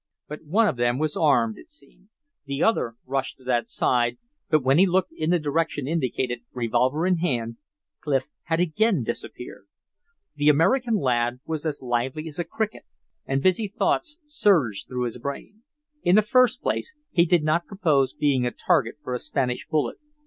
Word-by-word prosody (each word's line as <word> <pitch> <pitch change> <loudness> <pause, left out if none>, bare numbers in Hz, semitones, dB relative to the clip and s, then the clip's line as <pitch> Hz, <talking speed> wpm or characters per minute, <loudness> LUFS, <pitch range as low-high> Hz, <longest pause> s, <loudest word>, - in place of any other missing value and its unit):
But 150 +1 -8
one 210 +9 +3
of 130 - -1
them 120 +1 +1
was 155 +1 -1
armed, 120 -8 +2
it - - -16
seemed. 150 +7 -19 0.4
The 140 0 -2
other 120 - +1
rushed 135 0 -2
to 130 - -20
that 120 -2 0
side, 120 -1 +1 0.3
but 155 -4 +3
when 135 +4 +4
he 195 - +6
looked 185 0 +1
in 155 +1 -2
the 175 - +4
direction 150 -2 -1
indicated, 130 -5 -1
revolver 125 +6 +1
in 185 -1 +2
hand, 120 -9 -2 0.4
Clif 135 -2 -1 0.2
had 165 -1 0
again 180 - +2
disappeared. - - -7 0.7
The 145 +1 +3
American 230 - +3
lad 120 - 0
was 160 0 -3
as 145 -3 -3
lively 130 +5 -2
as 160 +1 -7
a - - +1
cricket, 215 +6 -3 0.5
and 135 0 0
busy 185 +3 +2
thoughts 300 - -1
surged 185 - +1
through 125 -1 -3
his 120 0 -4
brain. 140 - -7 0.4
In 175 - +3
the 215 - +6
first 255 +2 +3
place, 370 - -2 0.2
he 170 - +4
did 170 -2 +3
not 155 +3 +1
propose 150 -10 +1
being 140 -4 +1
a 120 - +1
target - - +1
for 125 - -4
a 125 - -2
Spanish 125 -3 -2
bullet. 155 -2 -1
150 Hz, 180 wpm, -25 LUFS, 125-180 Hz, 0.7 s, he